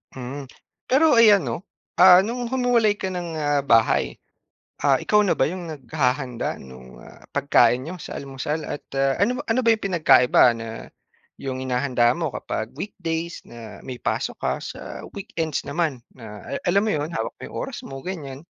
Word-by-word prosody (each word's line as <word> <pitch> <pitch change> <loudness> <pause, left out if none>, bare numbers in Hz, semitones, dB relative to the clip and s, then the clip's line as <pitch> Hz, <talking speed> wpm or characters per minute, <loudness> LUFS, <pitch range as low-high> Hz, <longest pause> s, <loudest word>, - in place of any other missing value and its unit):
Mm. 130 +1 -7 0.4
Pero 300 +5 +5
ayan 215 -4 +7
'no, 115 -2 -2 0.4
ah 180 -1 +10
no'ng 240 +1 -3
humiwalay 240 -5 +2
ka 190 -2 -3
ng, 175 -1 -4
ah, 145 -2 +1
bahay, 115 - +2 0.6
ah, 140 -2 +4
ikaw 210 +9 +3
na 200 - +1
ba - - +3
'yong 175 +1 -5
naghahanda 130 -3 -2
nung, 65 -1 -13
ah, - - -15
pagkain 125 +2 +3
n'yo 175 +1 -7
sa - - -7
almusal? 140 +3 -4
At - - -5 0.2
ah, 135 0 +2
ano 245 +5 +2
ba - - -3
ano 225 +2 +1
ba 230 - +2
'yong 225 -2 +2
pinagkaiba 125 -9 +5
na 115 0 -8 0.5
'yong 130 -1 -5
hinahanda 125 -2 +1
mo 160 -5 -2
kapag 110 +1 -4
weekdays 170 0 -5
na 115 -2 -11
may 125 -2 -7
pasok - - -2
ka - - 0
sa - - -8 0.3
weekends 165 -6 -3
naman 150 -5 -1 0.2
na 105 -4 -10
ala - - -2
alam 190 +2 +3
mo 220 - 0
'yon, 150 +1 -2
hawak 110 - -3
mo - - -21
'yong - - -8
oras - - -8
mo, 135 0 -8
ganyan? 150 -6 -7
145 Hz, 180 wpm, -23 LUFS, 125-185 Hz, 0.6 s, ah